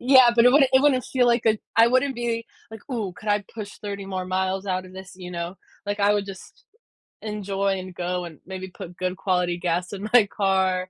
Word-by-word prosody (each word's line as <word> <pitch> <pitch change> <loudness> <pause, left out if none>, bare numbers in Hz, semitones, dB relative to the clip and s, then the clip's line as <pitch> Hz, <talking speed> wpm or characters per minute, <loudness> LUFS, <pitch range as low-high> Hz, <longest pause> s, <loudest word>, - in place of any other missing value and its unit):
Yeah, 255 -1 +7
but 235 0 +5
it 250 - +7
wouldn't 270 -2 +5
it 260 - +6
wouldn't 270 -3 +3
feel 250 -2 +1
like 235 0 +2
it 220 -1 +2 0.2
I 230 +1 +7
wouldn't 260 +2 +2
be 235 -1 -2 0.2
like, 220 -1 -9
"Ooh, 215 -7 -2
could 215 - -9
I 205 -1 +2
push 210 -3 -8
30 200 -1 -6
more 185 -1 -3
miles 190 +1 -1
out 185 -1 -1
of 185 - -14
this," 190 0 -10
you 180 -1 -8
know, 170 +1 -5 0.3
like, 205 +1 -2
I 205 +1 +4
would 205 - 0
just 195 - -11 0.6
enjoy 200 -2 -2
and 185 -1 -9
go 180 0 -2
and 160 -4 -11
maybe 190 0 -6
put 180 0 -10
good 185 0 -2
quality 180 -2 0
gas 175 +2 -2
in 200 +2 -5
my 240 -4 +7
car. 190 -2 0
195 Hz, 225 wpm, -24 LUFS, 185-230 Hz, 0.6 s, Yeah